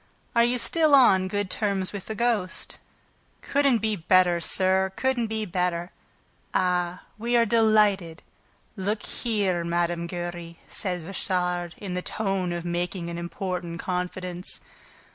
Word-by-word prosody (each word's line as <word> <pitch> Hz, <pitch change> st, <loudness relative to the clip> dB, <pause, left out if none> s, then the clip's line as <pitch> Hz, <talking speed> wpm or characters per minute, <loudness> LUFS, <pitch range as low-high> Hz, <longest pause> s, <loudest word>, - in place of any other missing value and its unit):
"Are 235 Hz, -, +6 dB
you 240 Hz, +1 st, +2 dB
still 310 Hz, +3 st, +3 dB
on 190 Hz, -8 st, +6 dB
good 205 Hz, -1 st, -2 dB
terms 200 Hz, -3 st, 0 dB
with 200 Hz, -2 st, -6 dB
the 220 Hz, -, -4 dB
ghost?" 220 Hz, -5 st, 0 dB, 0.6 s
"Couldn't 275 Hz, -6 st, +2 dB
be 215 Hz, -1 st, +1 dB
better, 180 Hz, -1 st, +4 dB
sir; 190 Hz, +2 st, +2 dB
couldn't 260 Hz, -3 st, 0 dB
be 220 Hz, 0 st, -2 dB
better." 180 Hz, -2 st, -1 dB, 0.6 s
"Ah, 180 Hz, -1 st, +1 dB, 0.2 s
we 240 Hz, +2 st, +2 dB
are 235 Hz, -, +5 dB
delighted... 210 Hz, -7 st, +3 dB, 0.5 s
Look 205 Hz, +2 st, -2 dB
here, 200 Hz, -7 st, -1 dB
Mme. 170 Hz, 0 st, 0 dB
Giry," 175 Hz, -1 st, -5 dB
said 180 Hz, -5 st, -3 dB
Richard, 180 Hz, -2 st, -2 dB
in 195 Hz, -3 st, -5 dB
the 180 Hz, -, -1 dB
tone 195 Hz, -3 st, -1 dB
of 175 Hz, 0 st, -4 dB
making 175 Hz, 0 st, -2 dB
an 170 Hz, -, -4 dB
important 175 Hz, -1 st, -4 dB
confidence. 180 Hz, 0 st, -3 dB
185 Hz, 135 wpm, -26 LUFS, 175-215 Hz, 0.6 s, Are